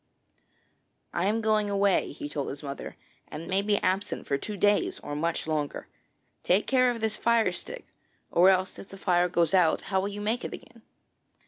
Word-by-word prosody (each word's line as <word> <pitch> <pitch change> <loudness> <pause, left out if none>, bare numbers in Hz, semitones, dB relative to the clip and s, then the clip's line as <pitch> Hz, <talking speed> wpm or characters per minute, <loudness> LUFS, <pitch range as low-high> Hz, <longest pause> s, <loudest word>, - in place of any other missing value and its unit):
'I 175 +2 0
am 220 +2 +1
going 215 -1 +2
away,' 200 -1 +2
he 145 - -6
told 145 -1 -4
his 140 +2 -7
mother, 140 -1 -7 0.3
'and 160 +2 -8
may 190 +1 +1
be 205 0 +1
absent 190 +2 -1 0.2
two 210 -2 -5
days 210 - +2
or 145 - -5
much 165 +3 -1
longer. 155 -2 -3 0.5
Take 190 +4 +2
care 255 -1 +3
of 235 -2 -3
this 220 -1 0
fire 230 -4 +2
stick, 480 - -7 0.5
or 180 +3 +6
else 185 0 +1
if 195 - -11
the 195 - -10
fire 180 -2 +2
goes 170 -1 +2
out, 180 -4 +4
how 190 - +4
will 200 - -2
you 205 0 -6
make 225 +4 -1
it - - -5
again? 230 -1 -16
195 Hz, 190 wpm, -28 LUFS, 170-215 Hz, 0.5 s, or